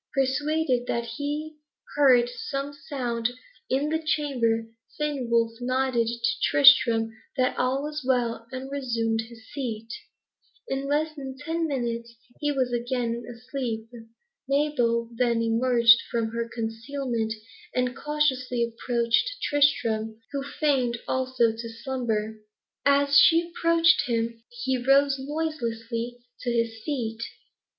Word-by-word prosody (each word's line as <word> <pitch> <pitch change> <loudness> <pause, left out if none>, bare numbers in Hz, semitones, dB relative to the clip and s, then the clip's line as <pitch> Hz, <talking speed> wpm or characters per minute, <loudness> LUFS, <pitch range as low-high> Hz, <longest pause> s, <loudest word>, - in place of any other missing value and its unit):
Persuaded 270 -1 +1
that 235 0 -1
he 295 +5 -4 0.4
heard 255 -4 +5
some 275 +3 -4
sound 245 -5 -2 0.4
in 275 +3 +1
the 320 +1 0
chamber, 250 -8 +1 0.3
Fenwolf 235 -6 0
nodded 255 -2 +1
to 235 0 0
Tristram 235 -5 +6 0.3
that 255 -1 +2
all 260 +2 0
was 300 0 -4
right, 245 -3 +1
and 260 +1 -6
resumed 230 -5 -1
his 225 -1 -13
seat. 230 -4 -4 0.7
In 270 +1 -2
less 305 +2 0
than 265 -2 -7
ten 325 +3 -2
minutes 235 -4 -3 0.2
he 295 -1 0
was 260 -3 0
again 240 -1 -1
asleep. 235 -2 -5 0.6
Mabel 245 -5 +1
then 235 -1 +1
emerged 230 0 +5
from 230 -2 -1
her 230 +1 -3
concealment, 230 0 -3 0.4
and 250 0 0
cautiously 260 -5 0
approached 235 - 0
Tristram, 225 -7 +1
who 280 -1 -2
feigned, 270 -4 0
also, 255 -3 +1
to 230 +1 -7
slumber. 225 -3 -3 0.5
As 280 0 +5
she 335 +1 +5
approached 335 -2 +3
him, 230 -1 -1
he 245 +2 -2
rose 275 +1 +4
noiselessly 245 -6 -3 0.2
to 245 - -3
his 230 -1 -1
feet. 230 -6 -3
250 Hz, 120 wpm, -26 LUFS, 230-280 Hz, 0.7 s, Tristram